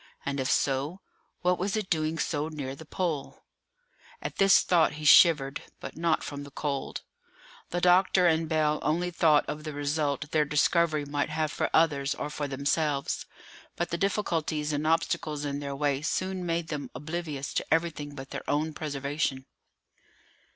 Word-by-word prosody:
and 140 0 -2
if 130 - -1
so, 140 +6 0 0.4
what 180 0 +2
was 200 +4 -1
it 210 -3 -2
doing 160 -1 0
so 150 -2 -1
near 140 -4 -5
the 160 +2 -12
Pole?" 165 -6 -3 0.8
At - - -6
this 195 -1 +6
thought 170 -3 +3
he 150 0 -7
shivered, 145 -3 +6 0.2
but - - -8
not 165 -1 +1
from 145 -1 -6
the 145 - -10
cold. 140 -1 -4 0.7
The 175 - -2
doctor 180 +1 +4
and 160 -1 +2
Bell 155 -1 +2
only 175 +3 0
thought 155 -3 +4
of 150 0 -5
the 155 -1 -5
result 145 0 -1
their 155 -1 +3
discovery 150 +1 +2
might 145 +1 -1
have 155 0 -1
for - - -1
others 145 -4 +2
or 150 - -4
for 150 -1 -3
themselves. 140 +1 -1 0.5
But 175 - -2
the 170 - 0
difficulties 160 -6 -1
and 150 +1 -1
obstacles 155 -2 0
in 140 0 -2
their 140 -1 -4
way 140 -1 0
soon 185 +3 -2
made 165 -1 -1
them 150 -2 -4
oblivious 150 0 -4
to - - -1
everything 155 -3 0
but 135 -1 -9
their - - -6
own 155 +2 0
preservation. 140 -2 -2
155 Hz, 165 wpm, -28 LUFS, 145-165 Hz, 0.8 s, this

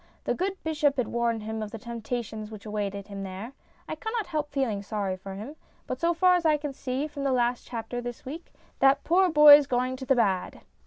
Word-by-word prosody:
The - - 0
good 380 +2 -2
bishop 295 -3 +1
had 250 -4 0
warned 235 -2 0
him 220 0 -4
of 215 - -4
the 225 - -7
temptations 225 -1 -5
which 215 -1 -10
awaited 200 -2 -3
him 200 -1 -6
there. 195 +6 -7 0.3
I - - -4
cannot 445 -1 -3
help 305 -4 -3
feeling 255 -8 -1
sorry 200 -2 -2
for 190 +1 -9
him, 225 +10 -8 0.3
but 255 - -4
so 335 0 +3
far 365 +2 +4
as 355 -1 +2
I 310 -2 +4
can 295 -1 -5
see 265 +2 -3
from 285 -2 -6
the 275 - +1
last 245 -1 0
chapter 245 +1 -5
this 245 -1 -7
week, 310 +6 -8 0.3
that 275 +1 +4
poor 370 +2 +4
boy's 295 -2 +9
going 255 0 0
to 265 - -7
the 270 - +4
bad." 195 -6 0
250 Hz, 220 wpm, -27 LUFS, 215-295 Hz, 0.3 s, boy's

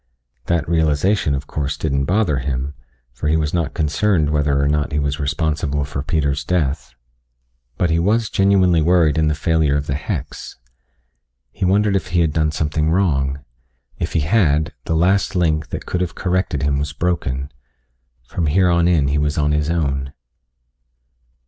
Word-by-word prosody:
That 85 -3 0
realization, 80 0 +1
of 70 +1 -5
course, 70 0 -3
didn't 70 -3 -1
bother 90 -6 +1
him, 65 +1 -3 0.4
for 65 +5 -4
he 80 +1 +3
was 75 -1 -1
not 85 -4 -1
concerned 80 0 +1
whether 75 -2 +1
or 70 - +2
not 75 0 0
he 75 - -1
was 70 0 -1
responsible 75 0 -1
for 70 -1 -4
Peter's 70 -2 -1
death, 75 -5 -2 0.8
but 85 -2 +1
he 80 - +2
was 110 +5 +1
genuinely 95 -4 +3
worried 80 -2 +3
in 80 - +2
the 75 - +1
failure 80 -2 +1
of 75 - -3
the 70 - -2
hex. 70 - -5 0.9
He - - -3
wondered 100 +2 +2
if 95 - -1
he 85 0 +1
had 80 -3 +1
done 80 -1 +1
something 75 0 -1
wrong. 70 -7 0 0.5
If - - -3
he 80 - +1
had, 80 -3 +2
the 80 - -1
last 95 +3 +2
link, 80 -4 +1
that - - -6
could 90 - -2
have 90 - -3
corrected 90 -6 -1
him 70 0 +1
was 75 0 -3
broken. 70 -5 -2 0.7
From 80 +5 -2
here 90 +4 +3
on 85 0 +3
in 75 -6 +2
he 75 +1 +1
was 75 +1 -1
on 75 -1 +1
his 75 0 0
own. 70 -5 -1
75 Hz, 175 wpm, -19 LUFS, 70-85 Hz, 0.9 s, he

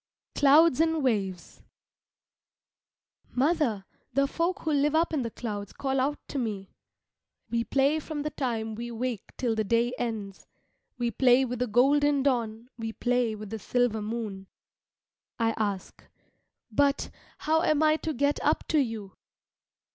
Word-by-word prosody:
CLOUDS 295 +1 +5
AND 320 -2 +1
WAVES 195 -8 -2 1.7
Mother, 260 - +1 0.3
the 275 +2 +3
folk 340 +7 -1
who 315 - -1
live 290 +1 +2
up 325 +1 +2
in 295 - +1
the 235 - -2
clouds 205 -3 -5
call 270 -1 -1
out 280 +3 0
to 280 - -3
me 205 -5 -4 0.8
"We 235 0 0
play 280 +3 +2
from 300 -1 -5
the 300 - -3
time 225 -6 -2
we 235 +2 -5
wake 235 -2 -4
till 240 -3 0
the 220 0 0
day 235 +3 +1
ends. 215 -5 -4 0.5
We 240 -1 -1
play 255 +3 +4
with 250 -1 -4
the 250 - 0
golden 280 +5 +3
dawn, 235 -4 -1
we 225 0 -4
play 245 -2 0
with 215 -1 -9
the 220 - -4
silver 245 -1 0
moon. 210 -3 -5 0.9
I 225 -1 +2
ask, 205 -3 -3 0.7
"But, 280 +5 +1 0.3
how 320 +1 +1
am 310 -2 +2
I 310 0 +4
to 320 - -3
get 285 +1 +1
up - - +1
to 315 - +3
you?" 225 -7 -3
245 Hz, 150 wpm, -28 LUFS, 220-285 Hz, 1.7 s, CLOUDS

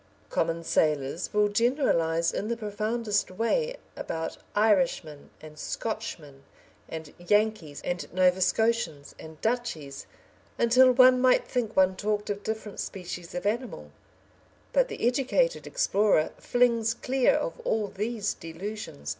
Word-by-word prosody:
Common 165 0 0
sailors 150 -1 0
will 210 0 +3
generalise 205 - +1
in 205 - -3
the 235 +1 -2
profoundest 215 0 -1
way 350 - 0 0.2
about 165 0 -4 0.2
Irishmen, 180 -8 +1
and 155 0 -12
Scotchmen, 170 -11 -5 0.5
and 160 -2 -7
Yankees, 205 -5 0
and 175 0 -4
Nova 185 +1 +3
Scotians, 185 -7 0
and 160 -1 -11
"Dutchies," 220 - -3 0.5
until 255 +2 +6
one 255 0 +6
might 255 0 +4
think 240 -4 -2
one 190 0 +4
talked 210 +1 -1
of 205 0 -4
different 220 -1 -5
species 180 -2 -6
of 180 - -4
animal, 235 +5 -3 0.8
but - - +4
the - - -4
educated 275 - +1
explorer 210 - +2
flings 230 -2 +2
clear 260 +1 +2
of - - -3
all 225 - -1
these 210 +1 -2
delusions. 165 - -7
210 Hz, 125 wpm, -27 LUFS, 170-235 Hz, 0.8 s, until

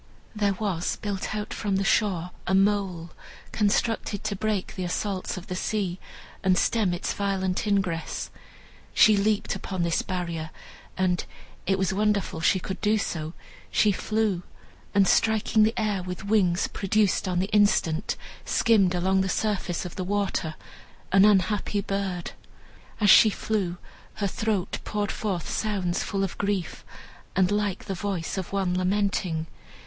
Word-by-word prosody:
There 205 -2 +2
was 185 -4 -1
built 205 0 -4
out 210 0 -4
from 205 -3 -1
the 195 - +1
shore 185 -4 +1 0.2
a 190 - +3
mole, 195 -4 +1 0.4
constructed 210 0 0
to 215 -2 -1
break 210 -1 -2
the 185 - -4
assaults 185 +2 -2
of 180 - -7
the 180 - -5
sea, 190 -2 -2 0.4
and 185 -1 +3
stem 215 -3 +2
its 175 - -2
violent 195 -1 -1
ingress. 190 -5 -1 0.6
She 215 0 +7
leaped 205 +1 +1
upon 185 -3 -3
this 170 -1 +1
barrier 170 -4 -3 0.5
and 185 -1 +1 0.4
(it 195 - +2
was 190 -1 0
wonderful 200 -5 0
she 190 +3 +3
could 190 +1 -6
do 215 +1 +3
so) 160 -5 -3 0.4
she 210 - +3
flew, 215 -2 0 0.5
and 195 -1 +5
striking 220 +1 +3
the 220 +2 +3
air 210 -3 0
with 180 +1 -6
wings 195 -4 +2
produced 205 0 +1
on 180 -1 0
the 190 +4 -1
instant, 200 -6 +2 0.3
skimmed 200 -6 +3
along 190 +2 +2
the 190 - -1
surface 185 -4 -1
of 180 - -8
the 185 - -2
water, 195 -5 -1 0.6
an 195 +1 +6
unhappy 205 0 +2
bird. 195 -3 -3 0.7
As 205 -3 +6
she 220 - +8
flew, 195 -4 -2 0.4
her 205 - -2
throat 200 -1 -1
poured 205 -1 -2
forth 190 -6 -3
sounds 195 -5 -1
full 195 -2 -1
of 195 - -4
grief, 200 -4 -2 0.5
and 185 +1 +3
like 205 -2 -1
the 195 - -3
voice 190 -1 -3
of 185 - -6
one 190 -2 0
lamenting. 185 -3 0
195 Hz, 150 wpm, -26 LUFS, 180-210 Hz, 0.7 s, she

